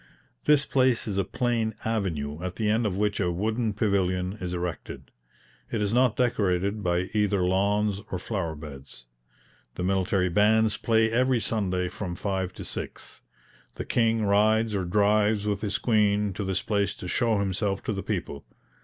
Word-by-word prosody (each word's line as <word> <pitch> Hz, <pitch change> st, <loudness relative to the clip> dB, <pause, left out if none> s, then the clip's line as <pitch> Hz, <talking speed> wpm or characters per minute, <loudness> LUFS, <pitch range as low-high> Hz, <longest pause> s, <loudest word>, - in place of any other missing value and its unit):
This 150 Hz, -1 st, +4 dB
place 130 Hz, -3 st, +2 dB
is 100 Hz, -2 st, -1 dB
a -, -, +2 dB
plain 115 Hz, +2 st, -1 dB
avenue, 85 Hz, -9 st, -2 dB
at 90 Hz, 0 st, -4 dB
the 110 Hz, -, -1 dB
end 110 Hz, +2 st, +2 dB
of 95 Hz, -2 st, -3 dB
which 105 Hz, 0 st, 0 dB
a 90 Hz, -3 st, +1 dB
wooden 110 Hz, +5 st, -1 dB
pavilion 95 Hz, -2 st, 0 dB
is 90 Hz, -1 st, -3 dB
erected. 90 Hz, -2 st, -5 dB, 0.6 s
It 115 Hz, -, -1 dB
is 105 Hz, 0 st, 0 dB
not 125 Hz, -1 st, +3 dB
decorated 100 Hz, -4 st, 0 dB
by 90 Hz, 0 st, -1 dB
either 105 Hz, -3 st, +1 dB
lawns 100 Hz, +2 st, +1 dB
or 95 Hz, -, -2 dB
flower 90 Hz, -4 st, -3 dB
beds. 70 Hz, -5 st, -11 dB, 0.7 s
The 90 Hz, -, -3 dB
military 95 Hz, 0 st, +1 dB
bands 105 Hz, +3 st, +3 dB
play 110 Hz, 0 st, +2 dB
every 125 Hz, +1 st, +2 dB
Sunday 95 Hz, -4 st, -1 dB
from 90 Hz, -1 st, -5 dB
five 95 Hz, -1 st, -2 dB
to -, -, -8 dB
six. -, -, -6 dB, 0.5 s
The -, -, -5 dB
King 115 Hz, -2 st, +1 dB
rides 110 Hz, +2 st, +3 dB
or 95 Hz, -3 st, -1 dB
drives 105 Hz, +2 st, +2 dB
with 105 Hz, -1 st, -1 dB
his 105 Hz, -2 st, -1 dB
Queen 105 Hz, -3 st, +2 dB
to 100 Hz, -, -4 dB
this 95 Hz, -1 st, -1 dB
place 100 Hz, -2 st, 0 dB
to 90 Hz, -, -8 dB
show 115 Hz, +4 st, +1 dB
himself 100 Hz, 0 st, -1 dB
to 110 Hz, -, -2 dB
the 100 Hz, -, -3 dB
people. 90 Hz, -10 st, -4 dB
100 Hz, 170 wpm, -26 LUFS, 90-110 Hz, 0.7 s, This